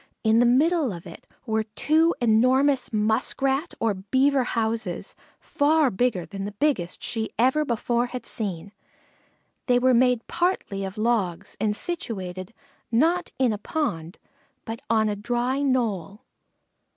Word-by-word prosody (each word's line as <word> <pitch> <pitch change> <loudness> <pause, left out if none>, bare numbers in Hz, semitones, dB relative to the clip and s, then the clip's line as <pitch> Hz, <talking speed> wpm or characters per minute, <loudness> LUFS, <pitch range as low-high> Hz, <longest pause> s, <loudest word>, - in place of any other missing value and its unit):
In 220 0 +4
the 245 - +5
middle 295 +2 +3
of 175 -1 -8
it 170 - -12 0.2
were 220 -2 0
two 310 +10 +2
enormous 255 +4 +3
muskrat 260 +7 0
or 225 -2 +1
beaver 260 +8 +1
houses, 230 -1 -2 0.3
far 295 -1 +2
bigger 195 -4 0
than 195 -1 -7
the 205 +1 -5
biggest 205 - -1
she 225 -2 -3
ever 260 +6 +3
before 240 -1 0
had 250 0 -7
seen. 200 -4 -3 1.0
They 245 -1 +4
were 255 +1 +3
made 250 -1 +3
partly 345 - -1
of 190 +2 -7
logs 205 -5 -1
and 210 -1 0
situated, 190 - -5 0.4
not 330 +10 +2
in 255 -4 +2
a 205 - -5
pond, 200 - -3 0.5
but 225 0 -6
on 220 -1 +3
a 210 - -1
dry 245 +5 -1
knoll. 220 - -1
235 Hz, 140 wpm, -25 LUFS, 210-265 Hz, 1.0 s, the